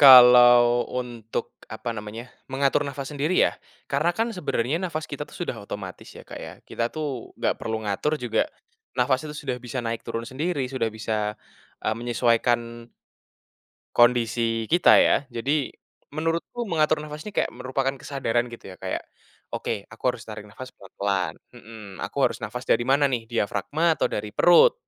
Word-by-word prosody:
kalau 120 -2 +9
untuk 120 -3 -4 0.2
apa - - -5
namanya, 105 +4 -7 0.2
mengatur 140 +2 +2
nafas 140 -1 -5
sendiri 150 +3 -1
ya - - +3 0.3
karena 155 +5 +2
kan 225 +6 0
sebenarnya 140 -3 0
nafas 165 -3 -3
kita 145 0 -4
tuh - - -19
sudah 175 - -2
otomatis 95 -3 -7
ya, - - -11
Kak, - - -11
ya. - - -7 0.2
Kita 115 0 -2
tuh 145 -6 -4
nggak - - +1
perlu 110 0 -3
ngatur 115 +9 -1
juga 125 - +1 0.5
nafas 130 +1 +1
itu 150 - -6
sudah 140 -4 -3
bisa 125 0 -5
naik 115 -1 -3
turun 115 0 -4
sendiri 140 -1 -2
sudah 125 -4 -1
bisa, 110 -1 -2 0.5
eee, 110 - 0
menyesuaikan 120 0 +1 1.1
kondisi 115 -1 +3
kita 175 +2 +6
ya. 140 - +3
Jadi, 140 +5 0 0.4
menurutku 165 +9 -2
mengatur 155 -2 +2
nafas 150 0 -8
ini 210 - -7
kayak - - +1
merupakan 135 +1 -1
kesadaran 125 -4 -1
gitu 120 -4 -10
ya - - -16
kayak, - - -3 0.5
"Oke, 100 - -3
aku 115 - -15
harus 120 - -9
tarik 105 -1 -8
nafas 115 +5 -10
pelan-pelan," 100 -1 -2 0.2
mmm, 110 -5 -11
"Aku - - -10
harus - - -1
nafas 125 +3 -5
dari 120 - +3
mana 140 +2 +4
nih 120 -3 -2
diafragma 145 +9 +1
atau - - +2
dari 105 0 -3
perut?" 175 - +7
125 Hz, 160 wpm, -25 LUFS, 115-145 Hz, 1.1 s, kalau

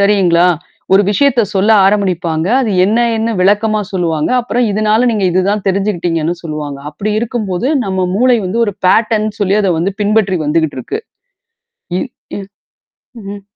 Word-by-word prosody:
சரிங்களா? 185 -4 +3 0.5
ஒரு 195 - +5
விஷயத்த 260 +3 +2
சொல்ல 195 +3 +2 0.2
ஆரம்பிப்பாங்க 180 -5 0
அது 240 -5 -1
என்ன 215 +4 +1 0.2
என்ன 225 +1 -1
விளக்கமா 210 +2 +2
சொல்லுவாங்க. 165 -4 -1
அப்புறம் 245 0 -1
இதனால 215 +3 +2
நீங்க 210 -3 -1
இதுதான் 195 +3 0
தெரிஞ்சுகிட்டீங்கன்னு 175 -4 -1
சொல்லுவாங்க. 150 -3 -5
அப்படி 200 +8 -3
இருக்கும்போது 225 -3 -2 0.2
நம்ம 190 -2 -1
மூளை 250 +2 +3
வந்து 215 +6 -1
ஒரு 205 - -3
பேட்டர்ன்னு 215 +1 +1
சொல்லி 200 0 +2
அத 195 - +1
வந்து 190 +4 -1
பின்பற்றி 205 -3 +1
வந்துகிட்டு 155 -2 0
இருக்கு. 430 - -5 1.0
இ - - -1 0.4
இ - - -5 0.8
ம்ஹ்ம். 200 0 -8
200 Hz, 140 wpm, -14 LUFS, 180-215 Hz, 1.0 s, ஒரு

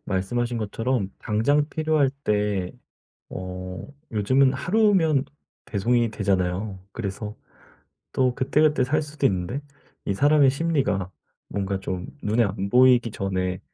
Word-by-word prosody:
말씀하신 120 +6 -1
것처럼 110 -1 -1
당장 145 +8 +1
필요할 155 -4 +1
때 105 -3 0 0.6
어 90 0 -6 0.3
요즘은 130 +6 +3
하루면 170 -2 +2 0.4
배송이 115 +3 +1
되잖아요. 95 -1 -1
그래서 105 0 -5 0.8
또 130 -1 +2
그때그때 145 +1 +2
살 155 +4 +1
수도 145 -2 0
있는데 95 +7 -2 0.4
이 100 - 0
사람의 145 +3 +5
심리가 135 - 0 0.4
뭔가 100 -1 -2
좀 95 -1 -4 0.2
눈에 110 +3 +2
안 100 0 -3
보이기 125 -1 +5
전에 95 -2 -2
115 Hz, 260 characters per minute, -24 LUFS, 95-140 Hz, 0.8 s, 사람의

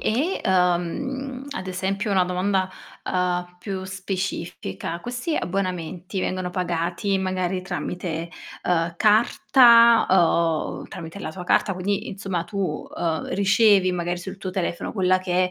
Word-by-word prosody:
e 285 +12 0
uhm, 215 +9 0
ad 190 -8 -5
esempio 195 +3 -2
una 190 -2 +3
domanda, 185 +1 0 0.3
uhm, 180 -1 -1
più 190 0 -5
specifica, 185 - -4
questi 250 - -3
abbonamenti 185 0 -3
vengono 185 -1 -2
pagati 180 +2 -1
magari 185 -1 -1
tramite, 170 -2 -4 0.3
uhm, 170 -1 +1
carta, 235 +1 +6
uhm, 170 -3 +2
tramite 170 +2 -8
la 155 - -5
tua 180 +2 -8
carta, 195 +2 +2
quindi 195 +2 -2
insomma 190 -3 -3
tu, 190 -6 -3
uhm, 160 -2 -2
ricevi 200 -1 +4
magari 175 0 -2
sul 190 +2 -7
tuo 190 - -4
telefono 180 -2 -3
quella 185 -2 +3
che 180 0 0
185 Hz, 130 wpm, -24 LUFS, 175-200 Hz, 0.3 s, carta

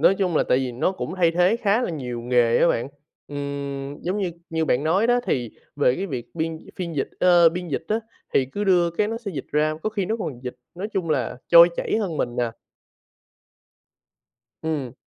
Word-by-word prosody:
nói 195 - +6
chung 180 -5 +1
là - - +4
tại 125 - +4
vì 130 -2 -2
nó 125 +10 0
cũng 185 -2 -5
thay 170 -3 +4
thế 180 +6 +3
khá 225 +1 +2
là - - -1
nhiều 125 -7 -4
nghề 120 -1 +3
á - - +5
bạn. 115 +3 0 0.4
Ừm, 140 -1 -5
giống 185 +4 -1
như 190 -3 -1 0.2
như 160 0 0
bạn 140 -1 +1
nói 185 +8 +3
đó 245 +1 +3
thì 120 -4 -1 0.3
về 135 -4 +3
cái 195 - -3
việc 125 -8 -5
biên 160 -1 -2 0.2
phiên 170 -4 -4
dịch, 135 - 0
ơ, 175 -2 +7
biên 175 +1 -5
dịch 145 - -3
á, 220 +2 +1 0.3
thì 135 - +4
cứ 205 - -2
đưa 175 -3 +4
cái 205 +5 0
nó 225 - -3
sẽ 225 -4 -6
dịch 135 - -5
ra, 155 +1 +2
có 215 - -1
khi 200 -3 -2
nó 220 +3 0
còn 140 - -5
dịch, 125 -1 -5 0.2
nói 195 +5 -4
chung 180 -5 -1
là, 135 -4 0
trôi 170 0 +9
chảy - - 0
hơn 185 -8 -2
mình 120 0 -2
nè. 120 -1 0 2.1
Ừm. 145 -6 -3
165 Hz, 220 wpm, -23 LUFS, 135-190 Hz, 2.1 s, trôi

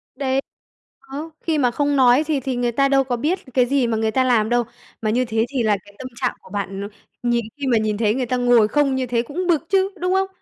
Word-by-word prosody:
Đấy. 270 0 0 0.7
Đó, 315 +3 -5
khi 320 -2 0
mà 250 -4 +2
không 285 +2 0
nói 255 +2 +5
thì 300 -3 +1
thì 260 0 -3
người 245 0 0
ta 275 +3 +2
đâu 270 -1 +4
có 245 -2 -2
biết 335 +9 0
cái 250 -2 +4
gì 265 -1 +1
mà 225 -1 0
người 220 0 0
ta 260 +3 +2
làm 230 -4 +2
đâu? 240 0 +2 0.4
Mà 215 - 0
như 250 +3 +1
thế 225 0 0
thì 255 -4 0
là 210 -2 +2
cái 205 - -17
tâm 255 - -6
trạng 250 0 -1
của - - -17
bạn 195 0 -4
nó 200 - -4 0.4
nhìn 240 -2 +1
khi 280 -2 -3
mà 240 - +3
nhìn 215 -1 0
thấy 215 -1 +2
người 255 -1 -1
ta 250 +2 -1
ngồi 245 -3 +4
không 280 +1 +1
như 260 -1 -1
thế 235 -1 +1
cũng 335 +9 -4
bực 330 -2 +2
chứ, 390 0 +2
đúng 365 +1 +1
không? 385 0 +2
250 Hz, 270 wpm, -21 LUFS, 230-280 Hz, 0.7 s, nói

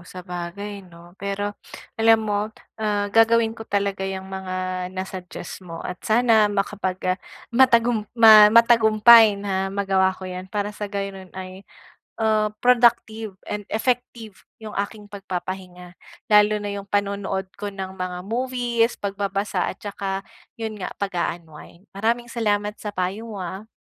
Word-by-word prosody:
sabagay, 180 +3 -7
'no? 170 0 -16
Pero 200 +1 -2 0.5
alam 225 0 +5
mo, 205 0 -1 0.3
ah, 210 -1 0
gagawin 225 0 +4
ko 225 - -14
talaga 200 -1 -1
yung 190 0 -5
mga 185 -1 -3
na-suggest 185 -1 -7
mo 170 -2 -9
at 180 - -6
sana 220 -2 +4
makapag, 195 -2 -2 0.2
ah, 185 - -5 0.3
matagum 235 -3 +3
ma 215 -2 +9
matagumpay 225 -1 +7
na 195 -1 -2
magawa 195 -1 +2
ko 190 - -10
yan 185 0 -6
para 205 +1 -2
sa 210 0 -5
gayon, 195 -2 -5
ay, 185 0 -8 0.6
ah, 215 -1 +2
productive 230 -4 +3 0.2
and 210 -1 -4
effective 235 -3 -2 0.2
yung 215 - -6
aking 205 0 -5
pagpapahinga 180 -2 -7 0.3
lalo 210 0 +6
na 205 - -3
yung 200 - -9
panonood 200 -2 -2
ko 205 -1 -5
ng 190 -1 -6
mga 180 0 -4
movies, 240 +1 0
pagbabasa 200 -1 -2
at - - -6
tsaka 195 -1 -4 0.3
yun 220 -2 -5
nga 185 - -5
pag-uunwind. 175 -1 -5
Maraming 230 +4 -1
salamat 210 -2 -1
sa 205 -1 -6
payo 190 +5 -3
mo, 190 - -5
ah. 190 +5 -7
205 Hz, 140 wpm, -23 LUFS, 190-220 Hz, 0.6 s, ma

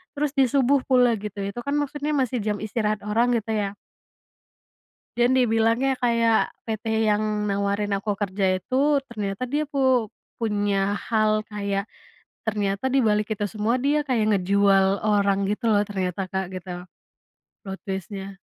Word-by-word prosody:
terus 290 -1 0
di 265 - +6
subuh 275 +1 +3
pula 250 -3 +4
gitu. 205 -1 -7
Itu 200 +4 -4
kan 285 +1 -1
maksudnya 290 +1 -2
masih 255 -3 0
jam 210 -1 -1
istirahat 215 -1 -1
orang, 235 +3 +2
gitu 220 +1 -6
ya. 200 -1 -2 1.4
Dan 240 +1 +3
dibilangnya 235 +2 +2
kayak, 230 -2 +2
PT 220 0 -4 0.2
yang 210 0 +2 0.3
nawarin 200 +1 -1
aku 205 +1 -2
kerja 190 -2 0
itu, 280 +4 +2
ternyata 205 -1 -4
dia 295 +3 0
pu 260 -6 +1 0.3
punya 205 -3 0
hal 215 -1 +2
kayak 200 -1 -2 0.7
ternyata 205 +1 -1
di 270 +1 +2
balik 210 -1 +2
itu 205 0 -2
semua, 220 +3 +1
dia 285 +4 +1
kayak 230 -4 +1
ngejual 195 0 +3 0.2
orang 200 -2 +2
gitu 230 +2 -2
loh, 205 -2 +4
ternyata 190 -2 -3
Kak, 190 0 -1
gitu 185 0 -7 1.0
plot 195 0 -5
twist-nya. 195 0 -6
215 Hz, 145 wpm, -24 LUFS, 200-245 Hz, 1.4 s, di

